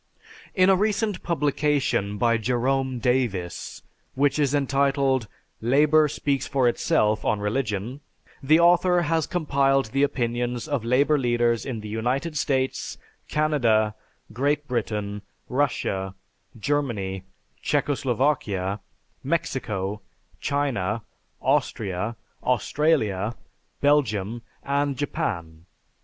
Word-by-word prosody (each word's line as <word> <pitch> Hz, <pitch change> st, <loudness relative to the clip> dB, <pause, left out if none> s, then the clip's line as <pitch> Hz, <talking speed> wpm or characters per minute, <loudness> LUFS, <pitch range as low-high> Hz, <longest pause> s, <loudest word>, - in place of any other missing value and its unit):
In 185 Hz, -2 st, +5 dB
a -, -, +6 dB
recent 210 Hz, 0 st, 0 dB
publication 145 Hz, -, 0 dB
by 115 Hz, +2 st, +3 dB
Jerome 130 Hz, +3 st, 0 dB
Davis, 115 Hz, -8 st, -1 dB, 0.3 s
which 140 Hz, +2 st, +2 dB
is 145 Hz, -1 st, +2 dB
entitled 135 Hz, -3 st, +1 dB, 0.3 s
"Labor 150 Hz, +6 st, +4 dB
Speaks 140 Hz, -2 st, -1 dB
for 135 Hz, -3 st, +2 dB
Itself 110 Hz, -5 st, +1 dB
on 105 Hz, -, +1 dB
Religion," 110 Hz, +3 st, -2 dB, 0.4 s
the 155 Hz, +4 st, +4 dB
author 175 Hz, +1 st, +4 dB
has 160 Hz, 0 st, 0 dB
compiled 135 Hz, -7 st, +1 dB
the 135 Hz, -, +1 dB
opinions 120 Hz, -2 st, -1 dB
of 140 Hz, -6 st, -1 dB
labor 140 Hz, +5 st, +3 dB
leaders 120 Hz, -1 st, +1 dB
in 120 Hz, -5 st, -4 dB
the 105 Hz, -, -7 dB
United 125 Hz, +9 st, -2 dB
States, 130 Hz, -3 st, -1 dB, 0.3 s
Canada, 120 Hz, -9 st, +2 dB, 0.4 s
Great 145 Hz, +4 st, 0 dB
Britain, 105 Hz, -4 st, -2 dB, 0.3 s
Russia, 100 Hz, -8 st, -1 dB, 0.4 s
Germany, 110 Hz, -8 st, -1 dB, 0.4 s
Czechoslovakia, 120 Hz, -8 st, 0 dB, 0.4 s
Mexico, 105 Hz, -, -2 dB, 0.4 s
China, 115 Hz, -7 st, -1 dB, 0.4 s
Austria, 105 Hz, +2 st, 0 dB, 0.3 s
Australia, 120 Hz, -5 st, +1 dB, 0.5 s
Belgium, 120 Hz, -7 st, +2 dB, 0.2 s
and 140 Hz, -1 st, 0 dB
Japan. 90 Hz, -, -3 dB
130 Hz, 95 wpm, -25 LUFS, 110-145 Hz, 0.5 s, a